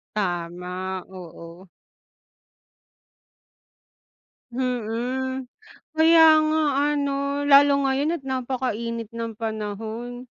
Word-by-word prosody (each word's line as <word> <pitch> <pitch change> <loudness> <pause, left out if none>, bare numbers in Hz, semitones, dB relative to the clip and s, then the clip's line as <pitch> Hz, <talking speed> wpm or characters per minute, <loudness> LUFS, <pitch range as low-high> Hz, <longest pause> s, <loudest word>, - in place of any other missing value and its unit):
Tama, 180 0 -3
oo 175 0 -11 2.9
Mhm, 255 +1 -2 0.5
kaya 325 0 +7 0.2
nga 310 +1 +1 0.3
ano. 280 -1 -1 0.4
Lalo 285 +1 +7
ngayon 275 +4 +1
at 335 - -4
napaka-init 245 -4 -3
ng 230 -1 -4
panahon. 220 +2 -5
235 Hz, 70 wpm, -24 LUFS, 200-265 Hz, 2.9 s, kaya